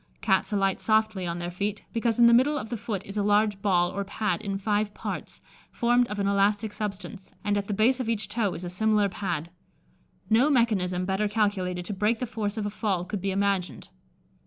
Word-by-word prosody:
Cats 190 0 +1
alight 195 -2 +1
softly 215 -4 +1
on 170 0 -3
their 175 0 -4
feet, 200 +3 -3
because 230 -1 0
in 240 - +6
the 235 - +7
middle 275 +5 +4
of 225 - -5
the 240 - -2
foot 215 -4 -4
is 200 +1 -7
a - - +2
large 205 0 +2
ball 180 -3 +2
or 200 - -3
pad 210 +2 -2
in 200 -2 -3
five 205 +1 -1
parts, - - -6 0.3
formed 240 +1 +2
of 210 - -5
an 200 - 0
elastic 205 +2 +1
substance, 200 -2 -6
and 205 0 +1
at 200 -1 -2
the 210 - -2
base 245 +6 +3
of 245 -3 -2
each 215 -3 -1
toe 205 -4 -1
is 175 - -6
a - - -4
similar 210 +2 +2
pad. 175 -4 -3 0.8
No 235 +7 +4
mechanism 195 -9 +1
better 195 +2 0
calculated 195 -4 -1
to 205 - -4
break 210 +4 +1
the 250 - -3
force 220 -3 -3
of 215 - -2
a 205 - -2
fall 200 -4 -1
could 195 +1 -4
be 195 - -1
imagined. 195 -2 -1
205 Hz, 215 wpm, -27 LUFS, 195-220 Hz, 0.8 s, the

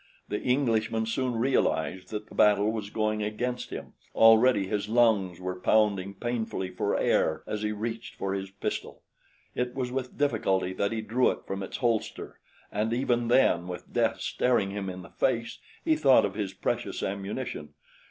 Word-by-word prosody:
The 105 - -2
Englishman 115 -4 +1
soon 125 +2 -1
realized 95 - 0
that 105 -1 -5
the - - -14
battle 105 0 +4
was 110 -2 -4
going 110 0 -1
against 120 +4 -3
him. - - -7 0.2
Already 115 -1 +6
his 105 +1 -2
lungs 110 -7 +3
were 90 0 -4
pounding 100 -2 +2
painfully 110 -4 -3
for 90 - -1
air 80 - +1
as 105 - -4
he 105 0 -1
reached 115 +2 -5
for 95 0 -2
his 95 0 -4
pistol. 100 +1 -5 0.5
It 125 0 -2
was 125 -2 -2
with 130 -1 -4
difficulty 95 -9 +1
that 100 +2 -1
he 115 -1 -2
drew 120 +4 +2
it - - -5
from 95 0 -4
its 95 - -5
holster, 115 -4 -2 0.3
and 105 +2 -1
even 120 -1 +1
then, 90 -8 +3
with 90 -1 -8
death - - +1
staring 115 -6 +1
him 100 -1 -4
in 90 0 -7
the - - -13
face, 115 -3 -1 0.3
he 320 -1 +4
thought 135 - +5
of 100 - -3
his 100 -2 -3
precious 95 - -3
ammunition. 100 - -4
110 Hz, 170 wpm, -28 LUFS, 95-120 Hz, 0.5 s, Already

